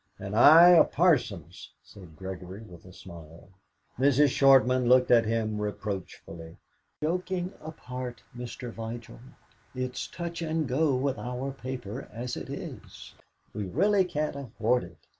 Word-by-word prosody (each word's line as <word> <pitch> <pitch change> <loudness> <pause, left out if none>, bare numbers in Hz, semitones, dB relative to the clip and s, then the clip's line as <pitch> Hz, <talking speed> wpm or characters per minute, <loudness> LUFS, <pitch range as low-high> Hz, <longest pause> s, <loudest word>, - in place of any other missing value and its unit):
"And 100 +1 -6
I 160 +9 +8
a 175 -3 +8
parson's," 120 - 0
said 90 -6 -15
Gregory, 95 +3 -8
with 90 -6 -14
a 90 - -13
smile. 85 -2 -13 0.5
Mrs. 140 +2 +4
Shortman 130 -2 +4
looked 125 0 +5
at 115 -2 +5
him 110 -1 -1
reproachfully. 95 -5 -6 0.5
"Joking 180 +3 -2
apart, 125 -6 -7
Mr. 120 0 -7
Vigil, 115 - -8 0.6
it's 130 0 -4
touch 170 0 -6
and 160 -2 -1
go 140 +2 +1
with 135 +1 -1
our 125 +3 -4
paper 130 -3 -7
as 120 +2 -5
it - - -8
is; - - -9 0.4
we 105 - -4
really 200 - +2
can't 155 -5 -3
afford 125 -2 -1
it. 85 0 -15
125 Hz, 135 wpm, -28 LUFS, 105-140 Hz, 0.6 s, I